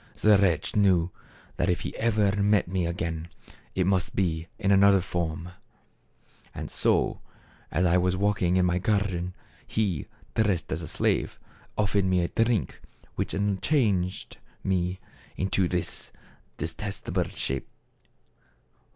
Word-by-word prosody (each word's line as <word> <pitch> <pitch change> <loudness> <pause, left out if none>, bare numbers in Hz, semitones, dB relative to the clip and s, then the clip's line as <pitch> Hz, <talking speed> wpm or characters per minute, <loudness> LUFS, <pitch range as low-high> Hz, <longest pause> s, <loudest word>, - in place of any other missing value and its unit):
The 105 -1 +5
wretch 90 -6 +1
knew 95 -4 +3 0.5
that - - +1
if 90 - +1
he - - -5
ever 105 -3 +2
met 100 -1 +3
me 90 -1 0
again 85 -1 -3 0.5
it 95 - +2
must 95 -2 +1
be 85 -3 0
in 100 - +1
another 100 0 +6
form; 85 -2 -3 1.2
so, - - +1 0.5
as 90 +4 +1
I 90 +1 +4
was 90 +1 +1
walking 95 -3 +2
in 90 - +4
my 90 0 +1
garden, 90 -3 0 0.3
he, 100 -9 -1 0.3
dressed 105 -6 +1
as - - -1
a - - -6
slave, - - 0 0.4
offered 100 -1 +2
me 90 -1 +2
a 85 - -1
drink 115 - -1 0.3
which - - -2 0.3
changed 100 - 0 0.3
me 90 -1 0 0.4
into 95 -1 +1
this 90 -1 -3 0.5
detestable - - -2
shape. 65 0 -3
95 Hz, 125 wpm, -27 LUFS, 90-100 Hz, 1.2 s, another